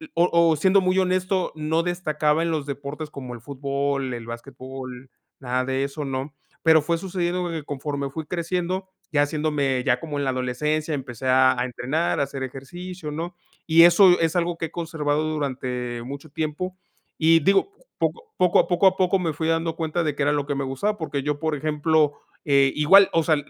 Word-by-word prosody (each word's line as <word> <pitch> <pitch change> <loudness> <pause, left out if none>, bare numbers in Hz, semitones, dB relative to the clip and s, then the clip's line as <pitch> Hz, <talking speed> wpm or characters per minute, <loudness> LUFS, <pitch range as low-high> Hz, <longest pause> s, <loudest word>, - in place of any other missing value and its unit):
o 175 - +4
o 170 -1 +4
siendo 190 +5 +4
muy 185 0 +1
honesto, 185 0 0
no 160 +2 0
destacaba 155 -3 0
en 170 - 0
los 155 -3 -2
deportes 145 +2 -6
como 130 -3 -7
el 115 - -11
fútbol, 140 0 -2
el 120 -1 -6
basquetbol, 130 +1 -8 0.3
nada 130 -1 -1
de 135 +1 -1
eso, 140 +2 -4
¿no? 135 +2 -4 0.3
Pero 160 -1 +6
fue 165 +3 0
sucediendo 180 -1 -2
que 160 -2 -4
conforme 140 0 -4
fui 160 +3 -6
creciendo, 180 +3 -2 0.2
ya 145 -1 +3
haciéndome 145 -4 0
ya 125 -1 +2
como 150 -1 -5
en 140 - -1
la 135 - +1
adolescencia, 150 +5 -1
empecé 130 -2 -6
a 130 0 +5
a 125 - +1
entrenar, 130 +7 -1
a 140 - +3
hacer 135 -1 -5
ejercicio, 155 +6 -7
¿no? 170 +3 -5 0.3
Y 165 +1 +7
eso 180 +1 +7
es 165 +1 +1
algo 175 -1 0
que 165 - -2
he 160 - -8
conservado 155 -3 -1
durante 125 -5 -3
mucho 140 +4 -8
tiempo. 160 +5 -3 0.4
Y 165 +1 +5
digo, 195 - +3 0.3
poco 460 -1 -2
poco 180 -1 +4
a - - +3
poco 185 +2 +4
a 190 - +3
poco 185 +1 +2
me 165 -4 -1
fui 160 +2 -2
dando 165 0 0
cuenta 165 +1 -1
de 150 -3 -1
qué 145 - -1
era 145 - +3
lo 145 -1 -1
que 145 - -1
me 140 - -2
gustaba, 165 +11 -2
porque 145 -4 -3
yo, 150 0 -2
por 160 -1 -1
ejemplo, 150 0 +1 0.3
eh 140 -2 +4
igual, 190 +7 +6
o 165 - +4
sea, 155 -1 +3
150 Hz, 200 wpm, -24 LUFS, 135-170 Hz, 0.4 s, Y